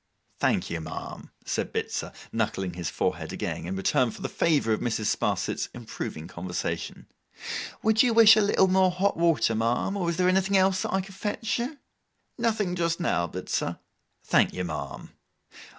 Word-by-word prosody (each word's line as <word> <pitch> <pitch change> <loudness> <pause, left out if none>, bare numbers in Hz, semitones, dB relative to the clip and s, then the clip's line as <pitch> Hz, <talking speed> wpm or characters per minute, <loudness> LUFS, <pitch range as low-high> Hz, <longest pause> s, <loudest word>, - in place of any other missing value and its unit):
'Thank - - +1
you, 85 -1 -2
ma'am,' 80 - -7 0.2
said - - -2
Bitzer, - - -3 0.2
knuckling 95 -2 -1
his 85 -2 -3
forehead - - -2
again, - - -4
in 95 - -3
return 105 +5 +2
for - - -9
the - - -2
favour 145 -9 +2
of - - 0
Mrs. 110 -3 0
Sparsit's - - -1
improving 80 +1 -6
conversation. 90 0 -4 0.8
'Would 220 +1 +4
you 250 - +4
wish 225 -1 +8
a 215 - +4
little 200 -2 +4
more 185 0 +4
hot 185 +3 +1
water, 165 -8 +3
ma'am, 115 - 0
or 180 -4 0
is 170 - -2
there 180 0 +3
anything 190 +1 +3
else 190 0 +3
that - - -2
I 190 - +1
could 195 +1 -11
fetch 210 +4 -2
you?' 255 +5 -3 0.6
'Nothing 215 -6 0
just 170 -1 0
now, 85 - +1
Bitzer.' 90 +2 -3 0.5
'Thank - - +3
you, 90 - -2
ma'am. 80 -4 -6
175 Hz, 170 wpm, -27 LUFS, -, 0.8 s, wish